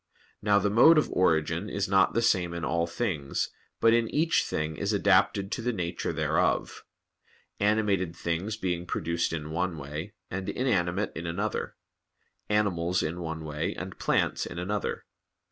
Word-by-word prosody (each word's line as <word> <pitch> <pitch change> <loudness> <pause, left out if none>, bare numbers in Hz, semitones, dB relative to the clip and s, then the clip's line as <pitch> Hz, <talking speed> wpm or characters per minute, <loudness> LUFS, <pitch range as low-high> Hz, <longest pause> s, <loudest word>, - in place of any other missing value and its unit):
Now 105 -1 +4
the 100 0 +1
mode 155 +10 +7
of 155 - +2
origin 85 +2 +1
is 100 0 -1
not 95 -1 +3
the 115 - +2
same 90 -6 +2
in 85 - -3
all 85 0 0
things, 85 -7 -2 0.3
but 115 - +5
in 115 -1 +2
each 160 +2 +2
thing 75 0 -2
is 100 +6 -1
adapted 100 0 +3
to - - -2
the 125 +2 0
nature 85 -5 -3
thereof; - - 0 0.8
animated 100 -4 +1
things 85 +6 -2
being 90 -3 -2
produced 85 +1 -1
in 80 -1 -4
one 85 0 -1
way, 75 +7 -6 0.2
and 95 +1 -3
inanimate 100 -6 0
in 85 +1 -5
another; 100 +5 -2 0.7
animals 90 -4 +1
in 80 +3 -3
one 80 -1 -5
way, 75 0 -3
and - - -7
plants - - +1
in - - -8
another. 100 +4 -3
90 Hz, 160 wpm, -28 LUFS, 85-105 Hz, 0.8 s, mode